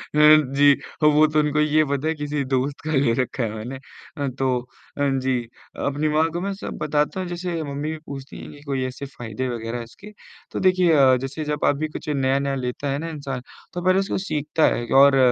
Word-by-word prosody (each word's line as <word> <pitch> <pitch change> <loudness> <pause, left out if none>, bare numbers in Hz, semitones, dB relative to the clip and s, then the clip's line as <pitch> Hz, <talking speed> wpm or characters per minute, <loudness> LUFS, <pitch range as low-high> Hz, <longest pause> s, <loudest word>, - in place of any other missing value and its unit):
जी, 145 -2 +6 0.3
वो 150 +1 +6
तो 155 0 +1
उनको 150 0 +1
तो - - +5
ये 155 +1 +3
पता 140 +2 -1
है 160 - +1
किसी 145 -1 -2
दोस्त 135 +2 -1
का 155 - -2
ले 135 -5 +3
रखा 125 0 -3
है 110 - -2
मैंने। 120 +5 -6 0.4
अ, 140 -1 -1
तो 130 -2 +1 0.4
हाँ 140 -1 +2
जी, 130 -1 0 0.5
अपनी 145 +2 0
माँ 155 +2 +3
को 175 +1 -3
मैं 200 +1 -2
सब 195 - -7
बताता 150 +4 0
हूँ, 185 - -3
जैसे 175 -1 -3
मम्मी 145 +1 -4
भी 160 - -4
पूछती 135 -1 -8
हैं - - -9
कि 145 - -14
कोई 135 -2 -1
ऐसे 130 +2 -6
फायदे 120 -2 -5
वगैरह 115 0 -4
हैं 120 - -5
इसके? 160 - -13 0.4
तो - - -3
देखिए, 185 -2 +4
अ, 135 -3 +6
जैसे 140 +4 -4
जब 150 - -1
आप 140 - +2
कुछ - - -6
नया-नया 135 0 +1
लेते 130 +2 -3
हैं 140 +1 -1
ना 165 +1 -4
इंसान, 140 -5 -5 0.3
तो 175 - -3
पहले 185 +1 +4
उसको 195 - -1
सीखता 155 -1 0
है 120 - -3 0.2
और 140 -1 +6
145 Hz, 220 wpm, -23 LUFS, 135-155 Hz, 0.5 s, जी